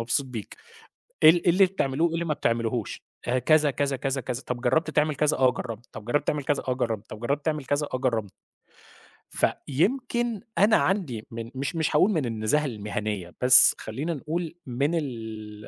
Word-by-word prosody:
مبسوط 120 Hz, +4 st, 0 dB
بيك. 115 Hz, -5 st, -7 dB, 0.7 s
إيه 155 Hz, -, +10 dB
ال 170 Hz, +1 st, +1 dB
إيه 175 Hz, -, +5 dB
اللي 190 Hz, +2 st, +5 dB
بتعملوه، 160 Hz, -3 st, 0 dB
وإيه 165 Hz, -, -3 dB
اللي 170 Hz, +1 st, -1 dB
ما 155 Hz, -2 st, 0 dB
بتعملوهوش؟ 115 Hz, -4 st, -2 dB, 0.2 s
آآ، 125 Hz, +1 st, +1 dB
كذا، 150 Hz, +3 st, +4 dB
كذا، 140 Hz, 0 st, -1 dB
كذا، 135 Hz, +1 st, -2 dB
كذا. 125 Hz, +1 st, -4 dB
طَب 125 Hz, -1 st, -3 dB
جرّبت 135 Hz, +6 st, +1 dB
تعمل 150 Hz, 0 st, +1 dB
كذا؟ 150 Hz, +1 st, +2 dB
آه 130 Hz, -1 st, +5 dB
جرّبت. 120 Hz, -2 st, -7 dB
طَب 105 Hz, -, -9 dB
جرّبت 135 Hz, +6 st, 0 dB
تعمل 145 Hz, -2 st, -1 dB
كذا؟ 145 Hz, -, 0 dB
آه -, -, +3 dB
جرّبت. 115 Hz, -4 st, -3 dB
طَب 110 Hz, -, -8 dB
جرّبت 140 Hz, +4 st, -2 dB
تعمل 150 Hz, -3 st, -1 dB
كذا؟ 145 Hz, +2 st, -1 dB
آه -, -, 0 dB
جرّبنا. 115 Hz, -6 st, -1 dB, 1.0 s
فيمكن 240 Hz, -, 0 dB, 0.2 s
أنا 210 Hz, +4 st, +5 dB
عندي 155 Hz, -, -1 dB
من 115 Hz, 0 st, -7 dB
مش 140 Hz, +4 st, -3 dB
مش 160 Hz, -2 st, 0 dB
هاقول 190 Hz, +7 st, +5 dB
من 155 Hz, -8 st, 0 dB
النزاهة 115 Hz, +6 st, 0 dB
المهنية، 105 Hz, -6 st, -4 dB
بس 125 Hz, 0 st, +7 dB
خلينا 140 Hz, +10 st, -4 dB
نقول 160 Hz, +3 st, -4 dB
من 140 Hz, +6 st, -1 dB
ال 110 Hz, -7 st, -6 dB
135 Hz, 190 wpm, -26 LUFS, 115-155 Hz, 1.0 s, إيه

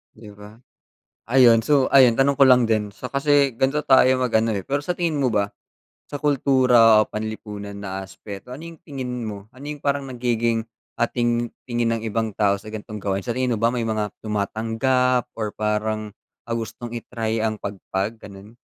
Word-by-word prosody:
'Di 110 Hz, -1 st, -12 dB
ba. 105 Hz, +1 st, -13 dB, 0.7 s
Ayun 120 Hz, -2 st, +6 dB
so 140 Hz, -1 st, +3 dB
ayun 130 Hz, -4 st, +6 dB
tanong 135 Hz, +3 st, +2 dB
ko 140 Hz, -, +8 dB
lang 125 Hz, -3 st, +5 dB
din 105 Hz, -2 st, 0 dB
so 125 Hz, -, -7 dB
kasi 140 Hz, 0 st, +3 dB
gan'to 135 Hz, +3 st, +1 dB
tayo 130 Hz, -2 st, +5 dB
mag 125 Hz, -, 0 dB
ano, 110 Hz, 0 st, +2 dB
eh. 100 Hz, -, -3 dB
Pero 140 Hz, +1 st, 0 dB
sa 180 Hz, -, -1 dB
tingin 170 Hz, -4 st, -1 dB
mo 135 Hz, -2 st, +2 dB
ba, 100 Hz, -1 st, 0 dB, 0.6 s
sa 145 Hz, -, -4 dB
kultura 125 Hz, -6 st, +5 dB
o -, -, -4 dB
panlipunan 105 Hz, -2 st, -6 dB
na 95 Hz, -1 st, -5 dB
aspeto 100 Hz, +3 st, -10 dB
ano 145 Hz, -, -10 dB
yung 165 Hz, -2 st, -11 dB
tingin 130 Hz, -6 st, -5 dB
mo? 100 Hz, -1 st, -7 dB
Ano 135 Hz, +3 st, -11 dB
yung 150 Hz, -, -6 dB
parang 140 Hz, -1 st, 0 dB
nagiging, 115 Hz, -2 st, -1 dB, 0.3 s
ating 120 Hz, 0 st, 0 dB, 0.2 s
tingin 120 Hz, -1 st, 0 dB
ng -, -, -9 dB
ibang 110 Hz, 0 st, -2 dB
tao 100 Hz, -2 st, +2 dB
sa 105 Hz, -, -16 dB
gantong 105 Hz, 0 st, -7 dB
gawain, 100 Hz, -1 st, -1 dB
sa -, -, -5 dB
tingin 130 Hz, -1 st, 0 dB
mo 110 Hz, -, -3 dB
ba 115 Hz, -, +5 dB
may 120 Hz, -2 st, -2 dB
mga 110 Hz, -1 st, -1 dB, 0.2 s
tumatanggap 115 Hz, +4 st, 0 dB
or 105 Hz, -2 st, -2 dB
parang 110 Hz, 0 st, -2 dB, 0.4 s
ang 115 Hz, -, -2 dB
gustong 115 Hz, +1 st, -6 dB
i-try 115 Hz, -1 st, -3 dB
ang 110 Hz, -1 st, -1 dB
pagpag 100 Hz, +2 st, -4 dB
gano'n? 100 Hz, +2 st, -12 dB
115 Hz, 185 wpm, -22 LUFS, 105-130 Hz, 0.7 s, ko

